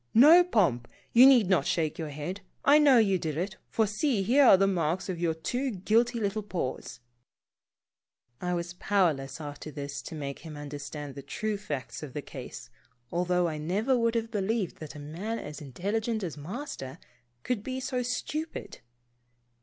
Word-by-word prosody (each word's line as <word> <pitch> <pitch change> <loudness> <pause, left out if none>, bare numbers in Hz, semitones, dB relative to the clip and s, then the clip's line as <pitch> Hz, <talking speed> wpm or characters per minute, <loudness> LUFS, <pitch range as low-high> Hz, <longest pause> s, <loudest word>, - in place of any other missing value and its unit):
No, 310 +9 +9
Pomp, 170 - +1 0.3
you 250 +3 +9
need 245 -7 +6
not 175 -6 +2
shake 160 -2 0
your 160 -2 -3
head. 150 +7 -5 0.2
I 285 +2 +7
know 285 -4 +6
you 195 -5 +3
did 155 -3 -3
it, 190 +3 -3
for 220 - +2
see, 215 +1 0
here 260 +8 +5
are 195 - +8
the 195 - +3
marks 175 -1 0
of 180 -3 -3
your 165 -2 0
two 250 +12 -2
guilty 230 +4 +1
little 210 0 -1
paws! 130 -10 -5 0.7
" 120 0 -49
I 180 0 -1
was 170 0 -4
powerless, 165 -8 0
after 145 0 -7
this, 140 -2 -6
to 145 - -8
make 140 -2 -5
him 155 -3 -9
under 145 0 -7
stand 145 0 -7
the 140 - -8
true 215 +10 -3
facts 150 -10 -5
of 145 -4 -8
the 145 - -4
case, - - -9 0.4
although 180 0 +1
I 155 -2 -4
never 205 - +1
would 230 -1 +1
have 225 0 -1
believed 205 -2 -1
that 155 -1 -9
a - - -8
man 175 +10 -4
as 150 -4 -7
intelligent 205 - -2
as 170 -5 -3
200 150 +4 -9
Pomposity. 245 - -3 0.3
Master, 135 +6 -10 0.4
could 245 -4 -1
be 260 +4 -4
so 255 -1 -2
stupid. 305 +6 -4
185 Hz, 185 wpm, -29 LUFS, 150-225 Hz, 0.7 s, No